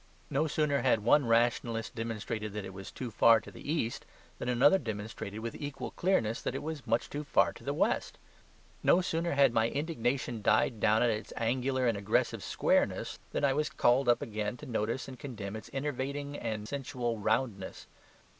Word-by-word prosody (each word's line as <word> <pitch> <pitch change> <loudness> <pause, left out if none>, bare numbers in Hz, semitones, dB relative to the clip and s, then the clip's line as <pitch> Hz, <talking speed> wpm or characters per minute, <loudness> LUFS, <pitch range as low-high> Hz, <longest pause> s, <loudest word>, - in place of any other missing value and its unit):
No 150 +4 +2
sooner 150 -2 +1
had 115 -5 +2
one 130 +3 +4
rationalist 115 0 +1
demonstrated 110 -2 -4
that 105 -1 -4
it 95 - -8
was 95 0 -8
too 125 -3 -6
far 115 +1 +6
to - - -12
the 145 - -6
east 120 -8 -1 0.4
than - - -3
another 140 +10 +5
demonstrated 110 -2 -5
with 115 0 -4
equal 145 -1 -5
clearness 115 - +1
that - - -3
it - - -4
was 150 -5 -5
much 115 +1 +1
too 145 +1 -5
far 145 - +3
to - - -14
the - - -1
west. - - 0 0.6
No 180 - +5
sooner 170 -1 -1
had 140 -4 +5
my 110 0 +3
indignation 130 -6 -1
died 110 +2 +2
down 110 +2 +4
at 120 - +3
its 110 0 -4
angular 130 +3 0
and 115 -2 +2
aggressive 100 - +1
squareness - - +1
than - - -2
I 135 - +3
was 150 +2 0
called 130 -3 +3
up 120 0 +3
again 105 +1 -3
to 150 - -10
notice 115 0 -2
and 130 -2 -9
condemn 110 -8 -6
its 110 - -8
enervating 140 +1 -3
and 110 -5 -4
sensual 125 -4 -3
roundness. 100 -3 -1
120 Hz, 185 wpm, -31 LUFS, 110-140 Hz, 0.6 s, far